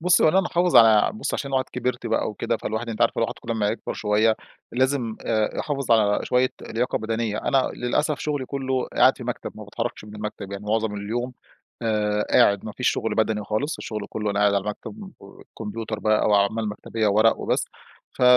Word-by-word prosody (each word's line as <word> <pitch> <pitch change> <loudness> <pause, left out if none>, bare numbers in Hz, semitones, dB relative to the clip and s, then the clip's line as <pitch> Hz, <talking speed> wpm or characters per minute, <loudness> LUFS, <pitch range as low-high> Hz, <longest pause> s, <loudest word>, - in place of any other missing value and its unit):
بصي، 175 +1 +4
هو - - +7
أنا 190 +5 +4
محافظ 180 -1 +2
على 110 -2 +7
بصي 110 - -2
عشان 140 - -4
الواحد 130 -1 +1
كبرت 125 0 -2
بقى - - 0
وكده، 115 +2 -2
فالواحد 110 +2 -4
أنتِ 110 -2 -5
عارفة - - +2
الواحد - - 0
كل 115 - -7
أمّا 110 -3 +1
يكبر 110 - -3
شوية 110 +1 +2 0.4
لازم، 125 -2 0
آآ 110 -2 0
يحافظ 140 -5 -1
على 105 -2 +3
شوية 125 +1 +2
لياقة 120 +3 -1
بدنية. 110 -1 -2
أنا- 135 -2 +1
للأسف- 145 +5 0
شغلي 145 -3 -2
كله 130 -2 -2
قاعد - - +5
في - - -8
مكتب، - - -4
ما - - -9
باتحركش - - -4
من 105 0 -11
المكتب 105 -2 -6
يعني 100 +1 -6
معظم 110 0 0
اليوم، 115 +5 -3 0.5
آآ 105 -2 0
قاعد 100 -1 +4
ما 110 - -5
فيش 125 - 0
شغل 110 -2 -1
بدني 110 -1 0
خالص، 125 +10 -2
الشغل 105 -2 -5
كله 110 -1 -4
وأنا 100 -1 0
قاعد 105 -1 +4
على 100 - +1
المكتب 190 - -7
وكمبيوتر 110 +2 -7
بقى 110 0 +2
أو 105 - +3
أعمال 105 +2 +2
مكتبية 110 +1 -2
وورق 110 +2 +4
وبس. - - -1 0.5
ف - - -5
110 Hz, 200 wpm, -24 LUFS, 105-125 Hz, 0.5 s, هو